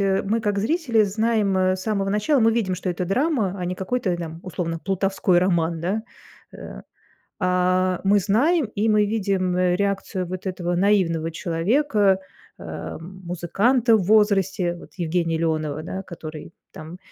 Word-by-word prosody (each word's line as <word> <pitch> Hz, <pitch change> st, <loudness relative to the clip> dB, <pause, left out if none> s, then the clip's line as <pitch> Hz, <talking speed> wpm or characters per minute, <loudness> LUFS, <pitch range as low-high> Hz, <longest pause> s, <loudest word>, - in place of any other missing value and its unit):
э, 195 Hz, -1 st, +1 dB
мы 220 Hz, +4 st, 0 dB
как 205 Hz, -2 st, -1 dB
зрители 240 Hz, -, +2 dB
знаем, 210 Hz, -1 st, +1 dB
э, 185 Hz, 0 st, +2 dB
с -, -, -8 dB
самого 200 Hz, -2 st, -1 dB
начала, 210 Hz, +8 st, +2 dB
мы 225 Hz, 0 st, +4 dB
видим, 215 Hz, -5 st, 0 dB
что 180 Hz, +1 st, -3 dB
это 180 Hz, +1 st, -3 dB
драма, 225 Hz, -, 0 dB
а 180 Hz, -, -3 dB
не 180 Hz, -, -2 dB
какой-то 190 Hz, 0 st, -1 dB
там 165 Hz, -1 st, -7 dB
условно 165 Hz, -2 st, -4 dB
плутовской 195 Hz, -1 st, +1 dB
роман, 170 Hz, -2 st, +1 dB
да, 195 Hz, +6 st, -1 dB, 0.5 s
э. -, -, -9 dB, 0.6 s
А, 185 Hz, 0 st, +1 dB
мы 205 Hz, +1 st, +5 dB
знаем 260 Hz, -, +2 dB
и 210 Hz, +2 st, +1 dB
мы 210 Hz, -1 st, +4 dB
видим, 195 Hz, -4 st, 0 dB
э, 180 Hz, -1 st, +2 dB
реакцию 195 Hz, -1 st, -2 dB
вот 185 Hz, +2 st, -6 dB
этого 175 Hz, -2 st, -2 dB
наивного 175 Hz, -4 st, +2 dB
человека, 195 Hz, -, +1 dB, 0.4 s
эм, 185 Hz, +4 st, -8 dB
музыканта 220 Hz, +8 st, +2 dB
в 200 Hz, -, -1 dB
возрасте, 195 Hz, -3 st, +2 dB
вот 175 Hz, -, -14 dB
Евгения 165 Hz, -1 st, 0 dB
Леонова, 155 Hz, -2 st, -1 dB
да, 190 Hz, +3 st, -5 dB
который 160 Hz, -3 st, -9 dB, 0.2 s
там 160 Hz, +3 st, -10 dB
190 Hz, 160 wpm, -23 LUFS, 175-210 Hz, 0.6 s, мы